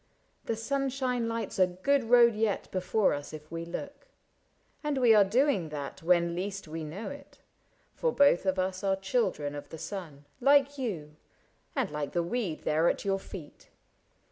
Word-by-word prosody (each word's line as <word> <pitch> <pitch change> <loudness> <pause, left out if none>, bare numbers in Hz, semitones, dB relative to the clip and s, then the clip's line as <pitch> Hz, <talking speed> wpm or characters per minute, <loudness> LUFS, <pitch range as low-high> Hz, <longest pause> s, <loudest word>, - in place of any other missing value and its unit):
The 230 - -1
sunshine 255 0 -1
lights 230 -4 -3
A 185 - +6
good 230 +9 +1
road 235 0 +6
yet 215 -1 -1
before 190 +3 +1
us 145 +1 -6
if 155 0 -10
we 165 0 -4
look. 180 - -7 0.8
And 295 -2 -1
we 245 -3 +6
are 210 -2 +7
doing 205 - +2
that 145 -2 -6
when 170 0 +3
least 195 +1 -4
we 160 +1 -5
know 180 - -6
it; 285 0 -12 0.6
For 485 - 0
both 280 - +4
of 190 0 +2
us 185 0 -1
are 195 -1 +2
children 195 - -1
of 145 - -8
the 160 - -8
sun. 155 -6 -7
Like 280 +1 +4
you, 155 - -4 0.6
and - - 0
like 150 -1 -4
the 175 - +1
weed 185 -3 -2
there 160 +2 +2
at - - -2
your 195 -1 +1
feet. 180 -6 -11
195 Hz, 170 wpm, -29 LUFS, 165-245 Hz, 0.8 s, are